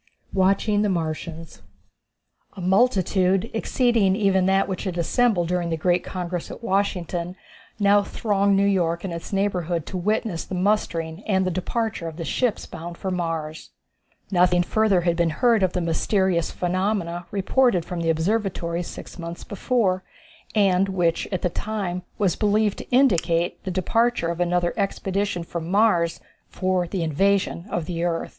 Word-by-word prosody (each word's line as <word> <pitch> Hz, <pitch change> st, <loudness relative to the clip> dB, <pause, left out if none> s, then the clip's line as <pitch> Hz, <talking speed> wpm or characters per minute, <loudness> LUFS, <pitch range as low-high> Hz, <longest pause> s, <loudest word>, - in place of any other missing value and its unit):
Watching 200 Hz, +2 st, +2 dB
the 210 Hz, -, +1 dB
Martians. 165 Hz, -1 st, -4 dB, 0.9 s
A 200 Hz, -, -11 dB
multitude, 190 Hz, 0 st, +2 dB
exceeding 225 Hz, -4 st, +2 dB
even 195 Hz, -3 st, +2 dB
that 195 Hz, 0 st, +3 dB
which 190 Hz, 0 st, -4 dB
had 180 Hz, -2 st, -3 dB
assembled 180 Hz, +1 st, +2 dB
during 180 Hz, -1 st, 0 dB
the 165 Hz, -, -1 dB
great 175 Hz, +2 st, +1 dB
congress 180 Hz, -2 st, -4 dB
at -, -, -9 dB
Washington, 180 Hz, -4 st, -1 dB, 0.4 s
now 205 Hz, 0 st, +5 dB
thronged 200 Hz, -1 st, +1 dB
New 200 Hz, -, +3 dB
York 170 Hz, -4 st, +1 dB
and 190 Hz, -3 st, -4 dB
its 170 Hz, -, -7 dB
neighborhood 180 Hz, -5 st, -1 dB
to 185 Hz, -, -5 dB
witness 205 Hz, -1 st, -1 dB
the 190 Hz, -, -6 dB
mustering 180 Hz, -3 st, 0 dB
and 190 Hz, -3 st, +2 dB
the 185 Hz, -, 0 dB
departure 185 Hz, +1 st, -2 dB
of 160 Hz, -1 st, -7 dB
the 165 Hz, -, -4 dB
ships 245 Hz, +4 st, 0 dB
bound 170 Hz, +1 st, -8 dB
for 190 Hz, -, -3 dB
Mars. 165 Hz, -3 st, -3 dB, 0.6 s
Nothing 180 Hz, -1 st, +4 dB
further 210 Hz, -1 st, +2 dB
had 170 Hz, 0 st, +1 dB
been 170 Hz, -1 st, +2 dB
heard 230 Hz, +7 st, +2 dB
of 185 Hz, -1 st, +2 dB
the 180 Hz, -, -1 dB
mysterious 175 Hz, +1 st, +1 dB
phenomenon 180 Hz, -1 st, -1 dB
reported 200 Hz, -2 st, +2 dB
from 175 Hz, -1 st, -5 dB
the 165 Hz, -, 0 dB
observatories 170 Hz, 0 st, -1 dB
six -, -, -9 dB
months 170 Hz, 0 st, -6 dB
before, 200 Hz, -3 st, 0 dB, 0.5 s
and 195 Hz, -2 st, +3 dB
which 175 Hz, -3 st, 0 dB
at 185 Hz, -, -2 dB
the -, -, +3 dB
time 195 Hz, -4 st, -3 dB, 0.2 s
was 195 Hz, -5 st, +1 dB
believed 210 Hz, 0 st, +1 dB
to -, -, -9 dB
indicate 175 Hz, -10 st, +2 dB
the -, -, -2 dB
departure 195 Hz, +1 st, +1 dB
of 170 Hz, 0 st, -3 dB
another 175 Hz, 0 st, +1 dB
expedition 195 Hz, -2 st, -1 dB
from 170 Hz, 0 st, -5 dB
Mars 185 Hz, -5 st, +2 dB, 0.3 s
for 185 Hz, -1 st, 0 dB
the 180 Hz, 0 st, -2 dB
invasion 185 Hz, +3 st, +1 dB
of 170 Hz, -, -2 dB
the 170 Hz, 0 st, -3 dB
earth. 170 Hz, -1 st, -1 dB
185 Hz, 160 wpm, -24 LUFS, 170-200 Hz, 0.9 s, now